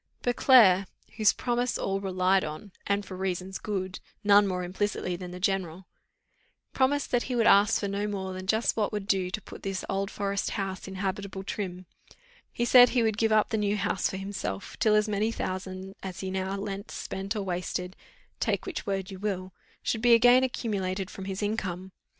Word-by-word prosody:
Beauclerc, 225 -6 +6 0.3
whose 215 -1 +5
promise 245 0 -1
all 195 0 -1
relied 185 0 +2
on, 155 +7 -7 0.2
and 200 0 0
for 185 - -8
reasons 185 0 -3
good, 190 -3 -3 0.2
none 205 0 +6
more 180 -1 -2
implicitly 185 0 -2
than 180 0 -7
the 180 +1 -8
general, 185 -2 -1 0.9
promised 275 +2 +1
that 245 - +3
he 250 - -1
would 230 -2 +2
ask 200 +2 +5
for 200 - -2
no 200 +1 -2
more 190 -2 -4
than 185 0 -7
just 220 +3 +2
what 215 -2 0
would 210 -2 -4
do 190 -3 +1
to 190 - -3
put - - -12
this 195 -1 -3
Old 195 0 -1
Forest 200 -1 -2
house 195 -1 -4
in 190 - -7
habitable 195 0 -3
trim; 185 -2 -5 0.7
he 240 - -1
said 245 0 +8
he 245 -2 +2
would 220 -1 0
give 225 -1 +2
up 215 -1 +4
the 220 - 0
new 205 0 +1
house 200 -1 0
for 190 - -5
himself, 195 - -5
till 215 -1 +4
as 210 0 +3
many 210 +2 0
thousands 185 -1 -5
as 190 -2 -6
he 190 -1 -3
now 190 +1 -2
lent, 200 0 -5
spent, 195 +3 -4
or 210 - -2
wasted 180 0 -3 0.4
take - - 0
which 375 -5 -5
word 195 -1 -2
you 190 - -8
will 190 -2 -3 0.3
should 225 - -1
be 240 0 +7
again 245 +2 +6
accumulated 200 -6 -2
from 190 - -8
his 195 +1 -4
income. 190 -3 -3
195 Hz, 195 wpm, -28 LUFS, 185-210 Hz, 0.9 s, said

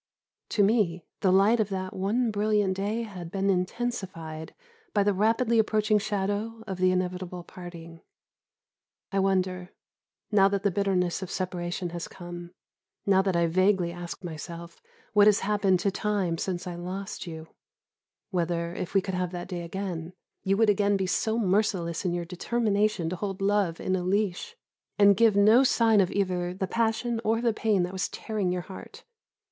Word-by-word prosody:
To 205 - +2
me, 195 -5 +2 0.2
the 190 - +3
light 200 +5 +4
of 215 -2 +1
that 185 -1 -4
one 220 +5 0
brilliant 210 -2 +1
day 210 +4 -2
had 185 -6 -8
been 195 +2 +1
intensified 180 -5 -3 0.4
by 205 - +4
the 205 0 +2
rapidly 225 +4 +2
approaching 215 -1 +2
shadow 210 +2 -2
of 190 -3 -5
the 185 0 +4
inevitable 180 -1 -2
parting. 170 -2 -10 1.1
I 195 - +1
wonder 185 -2 0 0.6
now 195 -2 +6
that 200 0 -1
the 200 - +2
bitterness 185 -2 0
of 190 - -5
separation 175 -1 -3
has 170 -1 -5
come, 175 -1 -9 0.6
now 190 -1 +4
that 190 -2 0
I 170 0 +3
vaguely 185 +1 +2
ask 175 +2 -7
myself 170 0 -8 0.3
what 205 0 +6
has 210 -1 +5
happened 195 -2 +2
to 200 - +1
Time 190 -4 -1
since 180 -2 -3
I 180 - -4
lost 185 +3 -6
you 160 -1 -8 0.8
whether, 170 -2 -1
if 180 - -5
we 195 - +5
could 190 0 -5
have 180 -1 -1
that 175 0 -5
day 180 -2 -4
again, 175 -1 -5 0.3
you 195 +1 +1
would 225 0 +4
again 205 0 +2
be 190 - -1
so 220 +5 0
merciless 190 -5 0
in 180 - +1
your 175 0 -2
determination 205 0 0
to 185 - -3
hold 195 +1 -4
love 195 -4 +1
in 185 - -1 0.2
leash, 205 - -1 0.4
and 200 -1 +6
give 225 0 +4
no 215 +6 +6
sign 225 -5 +4
of 185 - +1
either 180 -2 -1
the 190 - -1
passion 230 +2 0
or 225 +1 +2
the 235 -1 +1
pain 210 -4 +1
that 180 +1 -4
was 190 - -1
tearing 210 -5 -2
your 180 -1 -2
heart. 190 - -11
190 Hz, 170 wpm, -27 LUFS, 180-210 Hz, 1.1 s, now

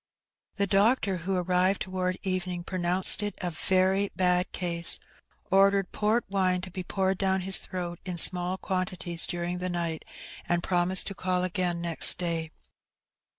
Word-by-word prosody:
The 200 - +1
doctor, 200 0 +2
who 185 +3 -3
arrived 180 +2 +1
toward 185 -1 -2
evening, 185 -2 -2
pronounced 180 +2 +1
it 205 -2 -3
a 180 - -3
very 190 +4 +1
bad 180 -1 +1
case, 170 -2 0 0.5
ordered 195 0 +3
port 215 +3 0
wine 185 -2 +1
to 185 0 -8
be 185 - -5
poured 190 +1 -1
down 190 -1 +1
his 190 +1 +1
throat 175 -1 -4
in 180 -2 -5
small 180 +2 +4
quantities 185 -3 -3
during 175 0 -3
the 185 0 -3
night, 170 -2 -3 0.5
and 175 0 +1
promised 180 +1 +3
to - - -4
call 185 -1 -1
again 180 -2 -1
next 170 -2 +3
day. 165 -2 -2
185 Hz, 150 wpm, -27 LUFS, 175-190 Hz, 0.5 s, small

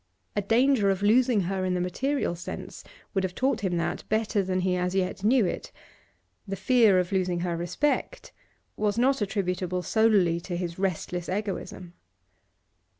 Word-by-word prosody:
A 205 - +1
danger 230 +1 +3
of 195 0 0
losing 235 +1 +4
her 190 +1 -2
in 185 -1 0
the - - 0
material 260 +7 -1
sense 175 +3 -8 0.3
would 195 -2 0
have 185 -1 -3
taught 265 +2 0
him 180 -3 0
that 170 +1 -2
better 215 -1 +1
than 185 -1 -1
he 180 0 +1
as 180 +1 -1
yet 190 0 -1
knew 235 +1 +4
it; 175 - -4 0.8
the 195 - -3
fear 215 0 +4
of 180 0 0
losing 180 -2 0
her 175 -1 -1
respect 285 - -2 0.4
was 210 0 0
not 265 +1 +2
attributable 185 -3 -1
solely 200 -5 +3
to 175 0 -5
his 175 0 -4
restless 180 -2 -2
egoism. 190 -2 -4
190 Hz, 160 wpm, -27 LUFS, 180-220 Hz, 0.8 s, losing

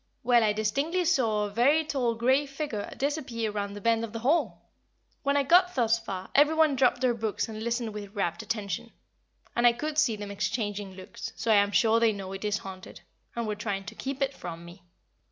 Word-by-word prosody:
Well, 240 -1 +4
I 215 - +3
distinctly 275 +12 0
saw 230 -11 +2
a 205 - -3
very 280 +9 +3
tall 255 -6 0
grey 260 +5 +2
figure 275 -7 -4
disappear 260 -6 -2
round 200 -1 -4
the 205 - -8
bend 230 +1 +2
of 230 -1 -6
the 230 - -5
hall! 320 +6 +1 0.5
When 280 0 +1
I 285 - +3
got 360 +5 +4
thus 230 -3 +2
far 190 -4 -6
every 295 +3 +5
one 315 -3 +4
dropped 250 -1 +2
their 255 -2 +3
books 220 -1 -2
and 215 -1 -7
listened 235 -1 -2
with 205 0 -8
rapt 170 -4 -1
attention, 210 -4 -4 0.6
and 240 0 +5
I 240 - +5
could 300 +5 -2
see 245 -8 +3
them 205 -1 -7
exchanging 205 -2 -3
looks, 185 -1 -8
so 225 - -1
I - - +6
am 200 0 +3
sure 225 +2 +4
they 230 -1 +3
know 195 -1 -6
it 195 - -7
is 210 -1 0
haunted, 190 -2 -10 0.3
and 235 -1 -2
were 215 - -1
trying 205 -2 -3
to - - -7
keep 275 0 -3
it 275 0 -1
from 170 -7 -8
me. 175 +2 -13
230 Hz, 215 wpm, -28 LUFS, 205-270 Hz, 0.6 s, I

